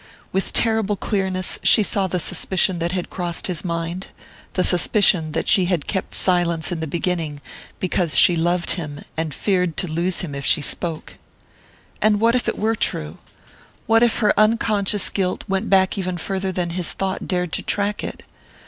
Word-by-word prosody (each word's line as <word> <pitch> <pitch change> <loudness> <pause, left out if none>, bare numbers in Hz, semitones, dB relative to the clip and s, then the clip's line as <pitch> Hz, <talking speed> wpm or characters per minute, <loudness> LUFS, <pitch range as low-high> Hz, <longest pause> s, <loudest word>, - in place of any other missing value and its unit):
With 190 - -2
terrible 220 -3 +3
clearness 190 -2 -2
she 215 - +5
saw 200 -1 0
the 180 0 -2
suspicion 180 +1 +1
that 170 +1 -2
had 180 -1 -4
crossed 175 -2 -3
his 175 -4 -1
mind 170 +1 -4 0.5
the 185 - +1
suspicion 180 -3 +4
that - - -2
she 185 - +5
had 175 -5 -1
kept 190 -3 -4
silence 175 -2 +1
in 175 - -3
the 160 - -4
beginning 165 -2 -3 0.4
because 180 -3 0
she 175 - +6
loved 175 +1 0
him, 150 -5 -5
and 160 -1 -3
feared 180 +1 -1
to 185 - 0
lose 170 +3 -1
him 165 -6 -6
if 140 0 -6
she 160 - +3
spoke. 160 +2 -2 0.8
And 210 -1 +3
what 230 +2 +3
if 250 - 0
it - - -1
were 220 +2 0
true? 75 - -3 0.7
What 225 +1 +3
if 240 -2 +2
her 210 - +2
unconscious 215 -2 +2
guilt 185 -2 -2
went 195 +2 -2
back 190 +1 +2
even 185 -1 -3
farther 190 +2 -3
than 175 -2 -3
his 175 -1 0
thought 190 -1 -4
dared 180 -2 -1
to - - -2
track 205 0 -1
it? - - -7
185 Hz, 180 wpm, -21 LUFS, 170-195 Hz, 0.8 s, she